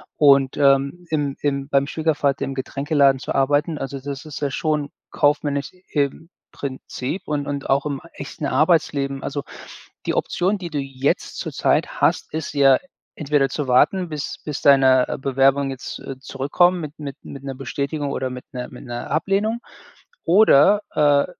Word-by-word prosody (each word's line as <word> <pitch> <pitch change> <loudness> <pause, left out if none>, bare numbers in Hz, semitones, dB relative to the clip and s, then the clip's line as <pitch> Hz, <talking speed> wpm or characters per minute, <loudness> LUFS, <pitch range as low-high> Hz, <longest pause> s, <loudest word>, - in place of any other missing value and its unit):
und, 140 -2 +5
ähm, 140 +4 +2
im 145 -3 -1
im 140 -1 -1
beim 140 -1 +2
Schwiegervater 145 -3 0
im 135 0 -5
Getränkeladen 140 0 +2
zu - - -4
arbeiten, 145 +4 +1
also, 135 0 -5
das 140 0 -6
ist 155 -3 -8
ja 145 -1 -1
schon 150 +1 -1 0.2
kaufmännisch 145 0 0 0.2
im 145 +3 -1 0.2
Prinzip 135 +5 -5
und 145 -1 -1
und 140 -1 -4
auch 135 +1 +2
im 140 -2 -2
echten 150 - -6
Arbeitsleben. 140 -2 +1
Also, 140 0 -3 0.6
die - - 0
Option, 190 +4 0
die 180 -3 -6
du 150 -2 -3
jetzt 135 0 -2
zurzeit - - 0
hast, - - +1
ist 160 -2 -4
ja 135 -2 +5 0.4
entweder 145 -2 +1
zu 145 -3 -3
warten, 180 +9 +3
bis 150 -2 -5
bis 150 -2 -4
deine, 130 -2 +5
äh, - - -2
Bewerbungen 135 +1 +2
jetzt, 135 -2 -6
äh, 135 - -7
zurückkommen 145 +7 +1
mit 150 -1 -7
mit 140 -2 -7
mit 140 -1 -9
'ner 135 -1 -5
Bestätigung 140 +2 -3
oder 130 - -2
mit 125 0 -8
'ner 125 -1 -5
mit 125 - -12
'ner 120 -1 -6
Ablehnung. 200 +8 0 0.7
Oder, 200 +1 +5
äh, 145 -1 +4
140 Hz, 165 wpm, -22 LUFS, 135-150 Hz, 0.7 s, und